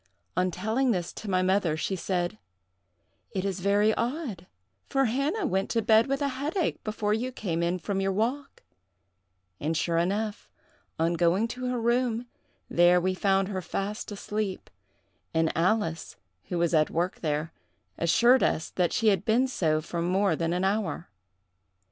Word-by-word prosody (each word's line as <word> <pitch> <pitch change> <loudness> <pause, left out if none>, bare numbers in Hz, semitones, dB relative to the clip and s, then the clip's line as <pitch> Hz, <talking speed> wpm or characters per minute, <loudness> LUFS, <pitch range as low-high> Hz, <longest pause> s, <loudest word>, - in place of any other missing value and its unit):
On 180 +1 +2
telling 220 +9 0
this 180 -6 -1
to 215 - -7
my 185 -1 +2
mother, 185 -4 +2
she 190 +4 -1
said: 175 - -2 0.9
'It 190 0 -2
is 195 -1 -2
very 205 +3 +3
odd, 235 - -3 0.4
for 270 0 +2
Hannah 280 - 0
went 195 -8 0
to 230 - +1
bed 220 +2 +5
with 275 +1 -1
a - - +2
headache 300 +6 -2
before 210 -1 -1
you 245 +4 -1
came 175 -9 -3
in 170 +2 +1
from 195 +3 -2
your 195 0 +1
walk;' 240 +8 -2 1.0
and 160 +2 -1
sure 165 0 +1
enough, 205 +5 -2 0.5
on 165 +1 +1
going 175 +6 +2
to 255 +1 -5
her 250 -1 -1
room, 235 0 +1 0.4
there 175 +1 +5
we 185 +1 0
found 195 0 +1
her 190 -2 -3
fast 200 +5 -4
asleep; 205 -1 -4 0.6
and 160 0 +2
Alice, 170 -1 0 0.3
who 180 - -3
was 170 0 +1
at 155 -1 +4
work 175 +3 -1
there, 155 0 -2 0.5
assured 235 +10 +5
us 160 - 0
that 180 -2 +1
she 225 - +3
had 195 -4 +1
been 240 +4 +3
so 155 -11 +1
for 170 +2 -4
more 185 +1 +2
than 165 +1 -1
an 180 +1 0
hour. 195 -4 -1
195 Hz, 165 wpm, -27 LUFS, 175-225 Hz, 1.0 s, bed